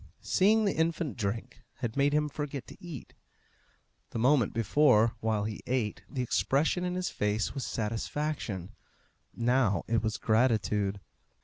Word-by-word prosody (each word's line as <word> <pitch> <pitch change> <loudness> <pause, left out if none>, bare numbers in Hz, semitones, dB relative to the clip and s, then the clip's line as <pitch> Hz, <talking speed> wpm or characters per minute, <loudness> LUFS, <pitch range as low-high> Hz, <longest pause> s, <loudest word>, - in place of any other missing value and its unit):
Seeing 215 +3 +3
the 200 - +2
infant 160 -3 0
drink 110 0 -4
had 120 -3 -4
made 140 +1 +3
him 150 0 +2
forget 145 -2 -5
to - - -14
eat. 165 -8 -8 1.0
The - - -5
moment 125 -1 +3
before, 115 0 +4
while 110 -2 0
he 105 0 -4
ate, 120 -5 -1
the 130 -3 -2
expression 145 +8 +1
in 180 0 -1
his 185 -1 -2
face 105 0 -1
was 135 -3 -4
satisfaction; 115 - -3 0.6
now 120 -3 +2
it 115 -1 +2
was 110 0 -1
gratitude. 105 -4 +1
120 Hz, 140 wpm, -30 LUFS, 110-150 Hz, 1.0 s, before